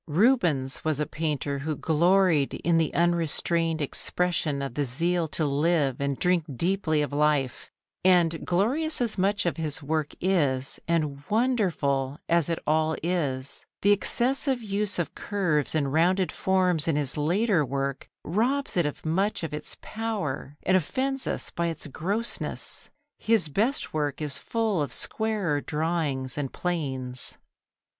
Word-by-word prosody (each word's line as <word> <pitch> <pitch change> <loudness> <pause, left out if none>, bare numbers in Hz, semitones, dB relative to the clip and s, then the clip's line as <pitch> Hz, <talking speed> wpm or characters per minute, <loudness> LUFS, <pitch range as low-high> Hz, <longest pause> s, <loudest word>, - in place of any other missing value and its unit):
Rubens 165 - +2
was 155 -2 0
a 150 - +1
painter 145 -3 -2
who 155 +2 -2
gloried 170 -2 +3
in 165 -1 +3
the 160 - +1
unrestrained 170 -1 +1
expression 155 -1 0
of 135 -3 -4
the 145 - 0
zeal 165 +6 +1
to 155 +1 -1
live 145 -1 +1
and 140 -1 -1
drink 180 -3 +2
deeply 170 -3 +1
of 145 - -4
life, 145 -3 +1 0.3
and 175 -3 +4
glorious 260 - +1
as 230 -5 -1
much 200 +1 +1
of 170 - 0
his 155 -2 -3
work 155 0 -1
is, 145 -8 0
and 150 -4 0
wonderful 175 - +1
as 170 -2 +2
it 165 - 0
all 155 +1 +2
is, 140 -7 -2 0.2
the 200 - +5
excessive 255 +6 +1
use 205 -2 -1
of 175 - -2
curves 170 -8 0
and 140 -3 0
rounded 180 +3 +3
forms 185 -5 +2
in 160 - +2
his 145 -3 +1
later 175 +4 +2
work 140 0 -3
robs 245 - 0
it 175 -4 +3
of 150 - -7
much 190 +5 0
of 160 - -4
its 150 - -4
power 200 -11 -4
and 185 - +3
offends 260 - 0
us - - -3
by 170 -1 -1
its 165 - -5
grossness. 200 - -3 0.3
His 220 -8 +2
best 225 - 0
work 145 -3 -1
is 150 -3 -2
full 220 -7 0
of 140 -4 -2
squarer 205 -10 -1
drawing 150 -4 -1
and 140 -3 -3
planes. 130 -8 -3
165 Hz, 150 wpm, -27 LUFS, 145-190 Hz, 0.3 s, the